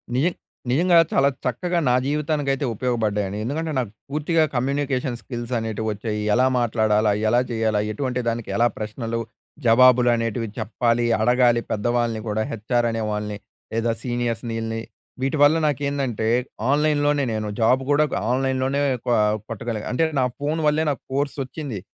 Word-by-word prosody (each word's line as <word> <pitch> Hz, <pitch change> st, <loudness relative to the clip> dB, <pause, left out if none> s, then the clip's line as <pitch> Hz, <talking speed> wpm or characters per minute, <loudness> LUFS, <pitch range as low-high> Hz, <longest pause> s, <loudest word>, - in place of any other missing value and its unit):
నిజ 135 Hz, +5 st, +2 dB, 0.5 s
నిజంగా 170 Hz, +6 st, +4 dB
చాలా 140 Hz, +1 st, +4 dB, 0.2 s
చక్కగా 175 Hz, +9 st, 0 dB
నా 125 Hz, -, +4 dB
జీవితానికైతే 145 Hz, -1 st, 0 dB
ఉపయోగపడ్డాయండి. 105 Hz, -4 st, -1 dB
ఎందుకంటే 155 Hz, +7 st, -2 dB
నాకు 120 Hz, -6 st, -1 dB, 0.2 s
పూర్తిగా 155 Hz, +3 st, +1 dB
కమ్యూనికేషన్ 130 Hz, -1 st, -1 dB
స్కిల్స్ 120 Hz, 0 st, -6 dB
అనేటివి 110 Hz, -1 st, -3 dB
వచ్చాయి. 105 Hz, +1 st, -3 dB
ఎలా 125 Hz, +3 st, +4 dB
మాట్లాడాలా? 110 Hz, -2 st, +2 dB, 0.2 s
ఎలా 120 Hz, +3 st, +4 dB
చేయాలా? 110 Hz, -2 st, +1 dB
ఎటువంటి 125 Hz, +2 st, -2 dB
దానికి 115 Hz, -1 st, -2 dB
ఎలా 120 Hz, +1 st, +4 dB
ప్రశ్నలు 115 Hz, +2 st, -4 dB, 0.5 s
జవాబులు 125 Hz, +1 st, +6 dB
అనేటివి 115 Hz, 0 st, -2 dB
చెప్పాలి, 120 Hz, +2 st, 0 dB, 0.2 s
అడగాలి, 120 Hz, 0 st, +4 dB
పెద్దవాళ్ళని 120 Hz, +1 st, 0 dB
కూడా, 105 Hz, +1 st, -1 dB
హెచ్ఆర్ 120 Hz, +2 st, 0 dB
అనే 115 Hz, 0 st, -2 dB
వాళ్ళని. 105 Hz, 0 st, -3 dB, 0.4 s
లేదా 115 Hz, +1 st, +1 dB
సీనియర్స్‌ని 120 Hz, -2 st, -2 dB
ఈల్లని. 115 Hz, 0 st, -3 dB, 0.4 s
వీటివల్ల 145 Hz, +3 st, +4 dB
నాకేందంటే 140 Hz, -5 st, -1 dB, 0.4 s
ఆన్‍లైన్‍లోనే 145 Hz, -1 st, +2 dB
నేను 110 Hz, -1 st, -2 dB
జాబ్ 125 Hz, +4 st, +4 dB
కూడా 145 Hz, +1 st, +4 dB, 0.3 s
ఆన్‌లైన్‌లోనే 130 Hz, +1 st, 0 dB, 0.2 s
కొ 125 Hz, -, 0 dB, 0.4 s
కొట్టగలిగాను. 115 Hz, -1 st, -4 dB
అంటే 145 Hz, +6 st, +2 dB
నా 130 Hz, -, +3 dB
ఫోను 150 Hz, +3 st, -1 dB
వల్లే 150 Hz, +1 st, +2 dB
నాకు 140 Hz, -, -5 dB
కోర్సోచ్చింది, 140 Hz, -3 st, -3 dB
120 Hz, 135 wpm, -23 LUFS, 115-140 Hz, 0.5 s, జవాబులు